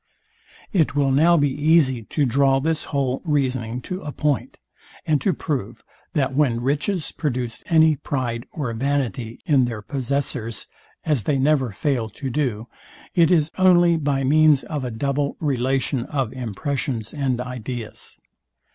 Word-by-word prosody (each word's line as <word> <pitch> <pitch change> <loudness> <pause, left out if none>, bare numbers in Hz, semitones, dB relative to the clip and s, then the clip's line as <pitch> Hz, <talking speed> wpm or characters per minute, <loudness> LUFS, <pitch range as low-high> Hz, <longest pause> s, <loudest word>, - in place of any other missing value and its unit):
It 160 -6 +2
will 140 -2 +2
now 165 +6 +5
be 145 -2 +2
easy 145 -3 +3
to 145 +5 0
draw 135 +2 +3
this 160 +2 -1
whole 135 -3 -1
reasoning 130 -6 -1
to 185 +8 -5
a 150 - -5
point, 145 -1 -1 0.5
and 150 -4 +1
to 190 - +2
prove, 135 - -4 0.3
that 135 -3 0
when 135 -6 +2
riches 150 +6 -1
produce 125 -6 -3
any 160 -2 +4
pride 125 -4 -3
or 135 -7 -3
vanity 125 -3 -2
in 140 -7 +4
their 115 -3 -5
possessors, 130 -4 -2 0.4
as 145 -9 0
they 145 - +1
never 135 -3 +2
fail 120 +1 -1
to 135 -2 -4
do, 120 -6 -1 0.5
it 170 -3 +4
is 160 -3 +3
only 175 -2 +5
by 140 -3 0
means 150 +1 +4
of 150 -4 -4
a 125 - -2
double 140 +4 -1
relation 130 -2 0
of 135 -6 -2
impressions 125 -1 -3
and 135 -4 -1
ideas. 125 -2 -6
135 Hz, 145 wpm, -22 LUFS, 125-150 Hz, 0.5 s, now